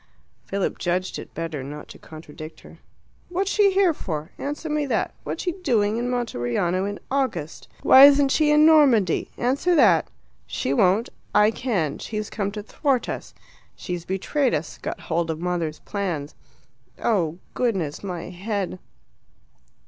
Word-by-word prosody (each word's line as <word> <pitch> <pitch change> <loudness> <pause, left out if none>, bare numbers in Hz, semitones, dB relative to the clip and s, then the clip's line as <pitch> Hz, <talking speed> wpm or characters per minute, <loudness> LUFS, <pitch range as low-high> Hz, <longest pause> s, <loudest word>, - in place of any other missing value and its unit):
Philip 195 -1 -2
judged 180 +1 -1
it - - -10
better 165 -4 -4
not 145 +3 -8
to - - -12
contradict 155 0 -11
her. - - -15 0.5
"What's 380 +3 -1
she 410 -2 +4
here 380 -3 +3
for? 155 - -5
Answer 295 +3 -4
me 300 -1 -1
that. - - -1
What's - - -4
she 360 - 0
doing 220 - +1
in 245 +1 -1
Monteriano 185 - -1
in 205 0 -4
August? 225 - -2 0.2
Why 265 +1 +9
isn't 285 -1 +6
she 305 +1 +3
in 300 +1 +6
Normandy? 265 - +4
Answer 280 +8 +1
that. 200 - +5 0.4
She 135 - -2
won't. 195 - +3 0.3
I 210 +1 +6
can: 200 - -2
she's 215 -1 -5
come 200 -2 -2
to 210 -1 -5
thwart 265 +3 0
us; - - -6 0.4
she's 175 -2 -5
betrayed 195 - 0
us 155 +2 -5
got - - -5
hold 165 0 -1
of 160 -1 -2
mother's 170 -3 -2
plans. 175 -8 -4 0.6
Oh, 175 -8 0 0.2
goodness, 190 - -1
my 180 -3 -5
head!" 190 0 -3
200 Hz, 150 wpm, -24 LUFS, 170-265 Hz, 0.6 s, Why